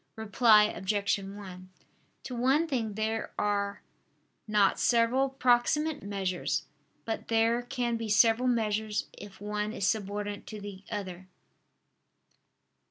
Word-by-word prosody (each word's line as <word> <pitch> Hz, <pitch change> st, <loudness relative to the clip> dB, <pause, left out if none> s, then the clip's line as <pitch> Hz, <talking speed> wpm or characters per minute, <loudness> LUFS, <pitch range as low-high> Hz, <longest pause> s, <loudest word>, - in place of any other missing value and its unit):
Reply 220 Hz, 0 st, +5 dB
Obj. 205 Hz, 0 st, 0 dB
1: 195 Hz, -2 st, -9 dB, 0.5 s
To 255 Hz, -, -6 dB
one 265 Hz, +7 st, +2 dB
thing 230 Hz, -8 st, -2 dB
there 220 Hz, +1 st, -2 dB
are 200 Hz, -1 st, -1 dB, 0.6 s
not 210 Hz, -2 st, +3 dB
several 245 Hz, +3 st, +3 dB
proximate 270 Hz, +4 st, +2 dB
measures; 185 Hz, -7 st, -2 dB, 0.4 s
but 225 Hz, -, -4 dB
there 230 Hz, +1 st, +2 dB
can 245 Hz, -2 st, -2 dB
be 225 Hz, -1 st, -5 dB
several 225 Hz, +3 st, +4 dB
measures 215 Hz, -3 st, 0 dB
if 205 Hz, -1 st, -11 dB
one 210 Hz, +1 st, -3 dB
is 195 Hz, -, -2 dB
subordinate 205 Hz, 0 st, -2 dB
to 215 Hz, -, -7 dB
the 200 Hz, -1 st, -9 dB
other. 185 Hz, -4 st, -6 dB
215 Hz, 115 wpm, -29 LUFS, 200-235 Hz, 0.6 s, Reply